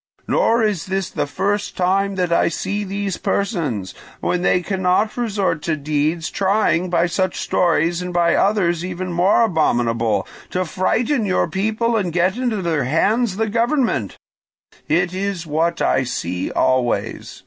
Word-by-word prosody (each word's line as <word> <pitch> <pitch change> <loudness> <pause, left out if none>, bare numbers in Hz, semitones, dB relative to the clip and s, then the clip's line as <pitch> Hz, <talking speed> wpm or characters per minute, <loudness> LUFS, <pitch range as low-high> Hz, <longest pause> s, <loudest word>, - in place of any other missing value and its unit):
Nor 230 0 +2
is 205 -6 -1
this 190 0 -2
the - - -2
first 200 +7 -2
time 195 +2 +1
that 180 -2 0
I - - +3
see 200 +5 -2
these 200 -1 -3
persons, 150 - -2 0.3
when 180 - -1
they 180 0 +2
cannot 190 +3 +1
resort 200 -9 -1
to 160 +1 -1
deeds, 155 +3 -1
trying 190 -2 +1
by 170 -1 +2
such 185 +1 -1
stories 170 0 +1
and 180 0 -4
by 170 -1 +2
others 180 -5 +2
even 180 0 -4
more 185 +6 +4
abominable 120 - +1 0.2
to 185 0 -1
frighten 225 - 0
your 185 - +1
people 220 +4 0
and 195 -6 0
get 180 +3 +1
into 235 -6 -1
their 160 -6 0
hands 200 - +1
the 220 0 0
government: 230 - 0 0.7
it 175 +3 +1
is 190 -2 -3
what 165 +2 0
I - - +2
see 90 -7 -3
always. 130 -2 -1
180 Hz, 150 wpm, -20 LUFS, 165-200 Hz, 0.7 s, more